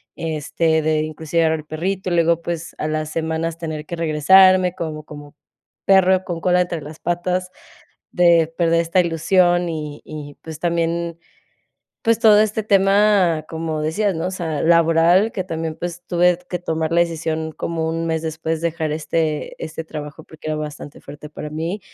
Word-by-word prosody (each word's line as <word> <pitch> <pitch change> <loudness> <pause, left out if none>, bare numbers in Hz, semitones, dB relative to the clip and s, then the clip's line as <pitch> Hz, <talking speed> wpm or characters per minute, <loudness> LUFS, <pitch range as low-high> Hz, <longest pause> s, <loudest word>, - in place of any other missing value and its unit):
este, 160 0 0
de 155 0 +1
inclusive 155 +1 -1
llevar 160 0 +1
al 155 - -11
perrito. 185 +4 -3
Luego, 170 0 +2
pues, 165 -1 -5
a 155 - -1
las 155 0 -2
semanas 160 0 -2
tener 155 -2 -5
que 170 - -5
regresarme, 180 +3 +5
como 155 -3 -5
como 145 0 -11 0.5
perro 190 -1 +4
con 170 -2 -4
cola 180 0 +3
entre 170 -3 -3
las 150 +2 -10
patas, 180 +1 -2 0.6
de 170 -2 +4
perder 165 -1 +3
esta 170 +2 +2
ilusión 175 +1 +2
y 150 -2 -5
y, 145 -2 -8
pues, 160 -2 -8
también, 170 0 -1 0.9
pues 230 0 +3
todo 210 -1 +6
este 215 0 0
tema, 195 -5 +3
como 160 -1 -3
decías, 195 +6 0
¿no?, 160 +2 -2
o - - -4
sea, 160 -5 -3
laboral, 170 +5 +4
que 185 - -3
también, 160 -2 -4
pues, 175 0 -6
tuve 175 0 +3
t 180 - -24
que 180 - -2
tomar 160 -2 -2
la 170 - +3
decisión, 160 -1 -2
como 165 0 -3
un 165 0 -2
mes 160 0 -1
después, 160 0 -3
dejar 165 -2 -2
este 155 0 -2
este 160 +1 -6
trabajo, 150 0 -8
porque 155 0 -10
era 155 - -1
bastante 150 -1 -7
fuerte 150 +1 -11
para 150 0 -7
mí. 165 +6 -3
165 Hz, 170 wpm, -20 LUFS, 155-175 Hz, 0.9 s, todo